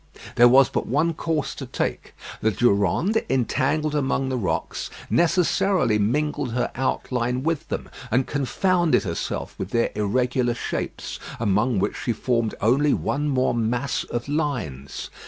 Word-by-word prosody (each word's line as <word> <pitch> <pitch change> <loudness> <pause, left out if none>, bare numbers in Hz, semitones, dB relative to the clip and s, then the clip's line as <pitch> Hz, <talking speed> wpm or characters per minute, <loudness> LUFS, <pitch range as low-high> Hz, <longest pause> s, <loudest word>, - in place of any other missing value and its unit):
There 120 - +7
was 130 +1 +6
but - - -2
one 155 +6 +1
course 160 -2 -2
to - - -7
take. - - -3 0.3
The 110 - +3
Durande, 110 - +2
entangled 135 +4 +1
among 135 -2 0
the 130 - -1
rocks, 110 -7 -2 0.2
necessarily 175 - +2
mingled 140 +3 0
her 125 - -1
outline 125 -1 -1
with 165 -1 -1
them, - - -3 0.2
and 130 +1 +2
confounded 175 +5 +1
herself 85 -5 -3
with 95 - -3
their 115 +1 +1
irregular 120 +3 0
shapes, - - -4 0.2
among 110 +2 +1
which 100 +2 0
she 130 -3 0
formed 115 -2 0
only 135 +6 +3
one 145 +1 -1
more 130 -2 +2
mass 120 +4 -1
of 120 +2 -4
lines. 125 - -3
130 Hz, 140 wpm, -24 LUFS, 115-150 Hz, 0.3 s, There